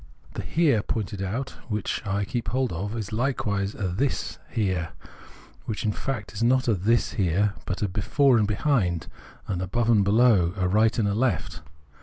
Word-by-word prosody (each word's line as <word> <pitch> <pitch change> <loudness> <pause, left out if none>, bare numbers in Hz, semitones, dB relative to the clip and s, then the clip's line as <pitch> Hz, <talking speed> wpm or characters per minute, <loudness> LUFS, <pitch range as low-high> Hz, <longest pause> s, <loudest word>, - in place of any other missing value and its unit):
The - - -4
Here 150 -9 +2
poiuted 105 -2 -3
out, 115 +8 -3 0.2
which 105 -2 -2
I 100 +1 0
keep 120 +2 -3
hold 130 -5 0
of, 100 +7 -4
is 105 -3 -5
hkewise 105 -5 -1
a 100 - 0
this 115 +10 -2
Here 95 -7 -1 0.7
which, 110 +2 -3
in 105 - +2
fact, 105 -5 -4
is - - -5
not 130 +2 +4
this 115 0 +1
Here, 100 +1 +1
but 95 +3 -2
a - - +2
Before 120 +7 +3
and 105 - +2
Behind, 100 - +1 0.4
an 90 -3 -2
Above 115 +6 +1
and 105 -3 +5
Below, 100 -4 +4
a 95 +2 +2
Eight 115 - +2
and 100 -3 +1
Left. 100 - -1
105 Hz, 170 wpm, -25 LUFS, 95-120 Hz, 0.7 s, and